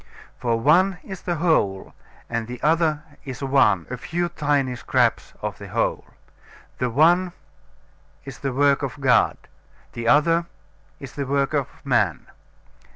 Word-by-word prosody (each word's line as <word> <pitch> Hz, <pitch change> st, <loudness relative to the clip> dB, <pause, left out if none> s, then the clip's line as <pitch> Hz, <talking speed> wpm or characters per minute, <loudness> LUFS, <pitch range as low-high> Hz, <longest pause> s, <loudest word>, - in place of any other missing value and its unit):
For 115 Hz, -2 st, 0 dB
one 175 Hz, +9 st, +3 dB
is 190 Hz, -2 st, -8 dB
the 175 Hz, -, -2 dB
whole, 150 Hz, -, 0 dB, 0.3 s
and 115 Hz, -1 st, -3 dB
the 125 Hz, 0 st, -7 dB
other 155 Hz, -1 st, +2 dB, 0.2 s
is 135 Hz, 0 st, -7 dB
one, 135 Hz, 0 st, +3 dB
a 125 Hz, -, -3 dB
few 175 Hz, +7 st, -2 dB
tiny 140 Hz, -5 st, 0 dB
scraps 120 Hz, -, 0 dB
of -, -, -4 dB
the -, -, -9 dB
whole. -, -, -1 dB, 0.7 s
The 125 Hz, -, 0 dB
one 170 Hz, +8 st, +3 dB, 0.9 s
is 135 Hz, -3 st, -9 dB
the 135 Hz, -, -2 dB
work 140 Hz, +1 st, +3 dB
of 135 Hz, 0 st, -5 dB
God; 125 Hz, -4 st, +3 dB, 0.6 s
the 115 Hz, -1 st, -4 dB
other 165 Hz, +5 st, +3 dB, 0.5 s
is 135 Hz, -1 st, -9 dB
the 140 Hz, -2 st, -4 dB
work 140 Hz, +1 st, 0 dB
of 140 Hz, -3 st, 0 dB, 0.2 s
man. 115 Hz, -, +1 dB
140 Hz, 145 wpm, -23 LUFS, 125-160 Hz, 0.9 s, one